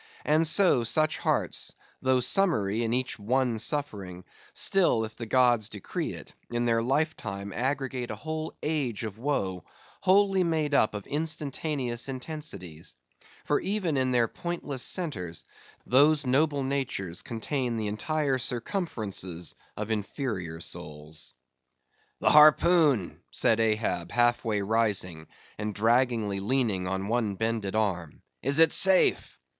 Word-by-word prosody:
And 160 +2 +3
so, 170 - +5
such 155 +6 +1
hearts, - - -1 0.3
though 130 -1 +2
summary 120 - +1
in 115 - -1
each 125 -1 -1
one 120 +2 0
suffering; 100 - -2 0.3
still, 170 -13 +2
if 110 - -10
the 115 - -7
gods 120 -3 +3
decree 105 -4 -4
it, - - -11 0.2
in 120 0 -1
their 115 -1 +2
life 150 +6 0
time 100 -2 -6
aggregate 130 0 -2
a 110 - -4
whole 155 +6 -5
age 140 -8 -2
of 110 -1 -6
woe, 95 - -2 0.4
wholly 195 0 +4
made 160 -3 0
up 110 -6 +3
of 105 - -6
instantaneous 145 -4 -2
intensities; 130 - -6 0.5
for - - +2
even 190 -6 -1
in 130 -1 +1
their 120 -2 +3
pointless 150 -3 -5
centres, 95 - -2 0.4
those 145 +3 +4
noble 140 +2 +2
natures 130 -10 -2
contain 120 +1 -3
the 110 - -2
entire 135 +6 -1
circumferences 110 - -2 0.2
of 105 +1 -4
inferior 105 - -3
souls. 75 -1 -7 0.8
"The - - +3
harpoon," 150 - +5
said 115 - +2
Ahab, 105 -6 0
half 120 0 +2
way 105 -3 -1
rising, 100 -7 -1 0.3
and 105 -1 -3
draggingly 115 -2 +1
leaning 105 -4 0
on 95 +1 -2
one 110 -3 0
bended 110 -1 -2
arm—"is 105 - -2
it 165 -1 +6
safe?" 190 - +4
120 Hz, 130 wpm, -27 LUFS, 105-145 Hz, 0.8 s, it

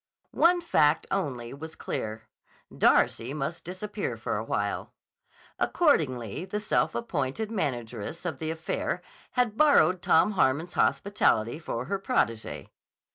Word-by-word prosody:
One 350 +1 +4
fact 155 - +3
only 130 -11 -2
was 160 +3 -8
clear: 110 +1 -4 0.5
Darcy 125 +5 +3
must 155 +3 -3
disappear 200 +4 -4
for - - -3
a - - -2
while. - - -2 0.7
Accordingly 130 - +1
the 205 +2 -3
self 210 - +1
appointed 195 - -2
manageress 125 - -3
of 160 -7 -3
the 155 - -2
affair 160 0 -2 0.3
had 245 -4 +1
borrowed 185 - +5
Tom 165 +6 +4
Harmon's 165 -1 +1
hospitality 150 - +2
for 125 -7 -4
her 195 +6 -2
protégée. 115 - -1
160 Hz, 125 wpm, -28 LUFS, 130-205 Hz, 0.7 s, borrowed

